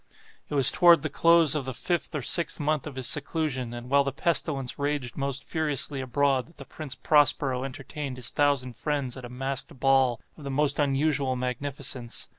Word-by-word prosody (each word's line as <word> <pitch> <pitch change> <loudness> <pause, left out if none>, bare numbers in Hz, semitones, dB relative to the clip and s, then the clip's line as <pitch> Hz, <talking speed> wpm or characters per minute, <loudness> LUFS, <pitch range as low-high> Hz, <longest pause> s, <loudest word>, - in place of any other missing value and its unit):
It 150 - -4
was 135 -3 +7
toward 170 -4 +5
the 155 - -3
close 165 -2 +4
of 150 -4 -2
the 130 -2 -5
fifth 175 +1 -2
or 145 - -3
sixth 170 +7 +3
month 150 0 -1
of 145 - -9
his 130 -1 -3
seclusion, 145 -5 -1
and 120 0 -8
while 140 +2 +3
the 140 - -3
pestilence 140 -3 -1
raged 140 -5 -3
most 140 0 -2
furiously 150 -3 -1
abroad, 135 0 0
that 165 - -22
the 140 - -10
Prince 150 -2 -7
Prospero 145 -3 +2
entertained 135 0 -7
his 125 - -5
thousand 140 -4 0
friends 140 -2 -3
at 130 -2 -9
a - - -9
masked 135 +1 -4
ball 135 -3 +2 0.2
of 150 - -12
the 140 - -6
most 145 +1 +1
unusual 140 -1 0
magnificence. 125 -1 -4
140 Hz, 190 wpm, -26 LUFS, 130-150 Hz, 0.2 s, was